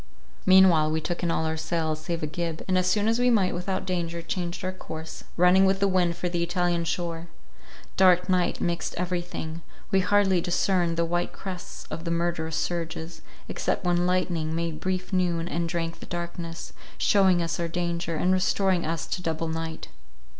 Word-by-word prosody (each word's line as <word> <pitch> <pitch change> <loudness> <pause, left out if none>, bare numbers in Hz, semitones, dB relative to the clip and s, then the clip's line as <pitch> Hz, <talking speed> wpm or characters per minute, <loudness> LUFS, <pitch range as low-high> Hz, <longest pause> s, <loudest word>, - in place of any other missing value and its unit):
Meanwhile 185 -5 +6
we 160 +1 0
took 175 +2 -3
in 175 - 0
all 160 -1 0
our 160 0 -1
sails, 160 -1 -1
save 165 0 -3
a - - +2
gib; 165 +1 -4
and, 185 - +1
as 180 0 +3
soon 205 +3 +2
as 230 +1 +2
we 250 0 +4
might 200 -6 +3
without 185 +2 -2
danger, 170 -2 -2
changed 175 +1 -3
our 185 - -1
course, 160 -3 -8
running 180 +2 +6
with 190 0 +3
the 200 - +3
wind 180 -3 +2
for 180 - -2
the 175 -1 -1
Italian 175 -1 0
shore. 165 0 -3 0.7
Dark 180 -1 +5
night 180 -2 +1
mixed 175 0 -2
everything; 175 -2 -3 0.3
we 195 - +4
hardly 190 -1 +3
discerned 175 -1 +1
the 170 - +2
white 175 +1 -1
crests 185 -2 -7
of 160 +2 -5
the 170 - -3
murderous 170 -2 -1
surges, 165 -1 -3 0.3
except - - -2
when 175 0 +2
lightning 175 -3 0
made 165 -2 -2
brief 185 +2 -2
noon, 175 -2 +1
and 170 -1 -2
drank 165 0 -3
the - - -10
darkness, 170 -1 -5 0.2
shewing 190 -3 +4
us 170 0 -2
our 170 - 0
danger, 170 0 -2
and 180 +4 +2
restoring 185 -1 +2
us 165 -1 -2
to 180 - -3
double 165 -1 -2
night. 160 0 -4
175 Hz, 185 wpm, -26 LUFS, 165-185 Hz, 0.7 s, Meanwhile